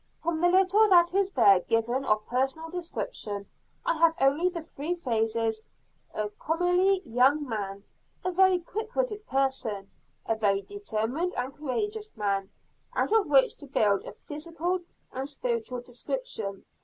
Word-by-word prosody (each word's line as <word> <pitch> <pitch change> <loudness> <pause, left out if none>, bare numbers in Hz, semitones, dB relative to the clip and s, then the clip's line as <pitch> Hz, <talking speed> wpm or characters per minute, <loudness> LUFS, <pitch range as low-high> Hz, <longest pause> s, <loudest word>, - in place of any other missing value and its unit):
From 325 -1 -1
the 350 - +5
little 385 +4 +5
that 345 -2 +6
is 390 0 +2
there 205 - +6
given 230 +7 0
of 215 -2 +1
personal 270 +6 -1
description 330 - -4 0.4
I - - +2
have 330 0 +5
only 285 +7 +3
the 340 -3 -6
three 320 +2 -4
phrases 225 -6 0 0.5
"a 210 -1 -2
comelie 355 - +1
young 265 +5 +3
man," 200 -3 -4 0.4
"a 370 - +1
very 375 0 +5
quick 435 +6 -6
witted 435 -4 -1
person," 260 -7 -1 0.3
"a - - +1
very 200 -3 +1
determined 335 - -2
and 255 +2 -3
courageous 415 - -3
man," 200 -2 -1 0.5
out - - +1
of 435 -4 +4
which 275 -2 +5
to 285 - -11
build 205 -7 +2
a - - -8
physical 335 +4 -3 0.3
and 265 +2 -4
spiritual 450 - -3
description. 245 - -4
290 Hz, 145 wpm, -28 LUFS, 225-365 Hz, 0.5 s, that